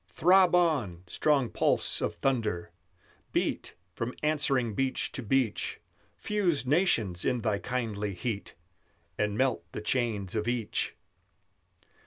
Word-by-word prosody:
Throb 180 - +5
on, 135 - +1
strong 135 - +1
pulse - - +1
of - - -1
thunder! 110 -10 -1 0.6
beat - - -1 0.2
From 120 +6 -4
answering 140 -6 +1
beach 130 +4 0
to 135 - -5
beach; 120 -1 0 0.4
Fuse 175 - 0
nations 120 - +2
in 125 -2 0
thy 105 -3 0
kindly 105 -6 -3
heat, 110 -1 -4 0.6
And 105 0 0
melt 130 -10 +1
the - - -4
chains 105 -4 -1
of 110 0 -1
each! 120 -3 -1
120 Hz, 120 wpm, -29 LUFS, 105-140 Hz, 0.6 s, Throb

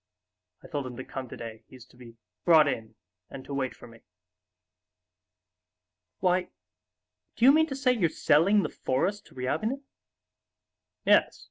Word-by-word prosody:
I - - -11
told 145 -5 -4
him 125 -1 -9
to 130 - -6
come 130 -2 -7
today, 110 -1 -9
he's 130 -2 -14
to 125 - -24
be 120 -2 -14 0.3
brought 160 -3 +6
in 115 -5 -4 0.3
and 130 - -9
to 140 - -7
wait 135 -2 -2
for - - -14
me...." 115 -1 -16 2.2
"Why, 180 0 +1 0.9
do 235 - +2
you 270 - +9
mean 315 +2 +4
to 270 - -5
say 265 -1 +2
you're 190 -9 +1
selling 190 +10 +3
the - - -2
forest 200 +11 -2
to - - -20
Ryabinin?" 215 - -2 1.2
"Yes. - - +4
145 Hz, 150 wpm, -28 LUFS, 125-205 Hz, 2.2 s, you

